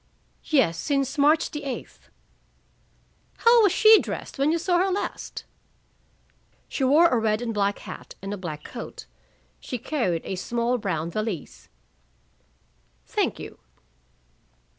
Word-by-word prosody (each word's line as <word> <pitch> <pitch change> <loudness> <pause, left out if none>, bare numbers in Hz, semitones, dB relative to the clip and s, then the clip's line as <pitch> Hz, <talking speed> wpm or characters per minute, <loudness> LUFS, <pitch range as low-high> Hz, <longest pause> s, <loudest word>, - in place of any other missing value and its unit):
"Yes. 210 - +2
Since 275 -1 -1
March 300 +3 +4
the 295 -1 -5
eighth." 270 -3 -7 1.3
"How 465 0 +6
was 405 -4 +5
she 440 +3 +7
dressed - - -6
when 285 +3 +3
you 335 - +2
saw 350 +1 +1
her 380 +2 +2
last?" 385 +2 -4 1.2
"She 275 - -3
wore 300 +6 +6
a 245 - +2
red 215 -1 +1
and 235 -1 -3
black 200 -1 0
hat - - -10
and 195 +1 -5
a - - -2
black 155 -5 -6
coat. 235 - -8 0.5
She 250 - -5
carried 235 - -1
a 190 - -4
small 235 +5 -1
brown 170 -5 -2
valise." 170 - -5 1.4
"Thank - - -1
you." - - -10
245 Hz, 135 wpm, -25 LUFS, 200-305 Hz, 1.4 s, she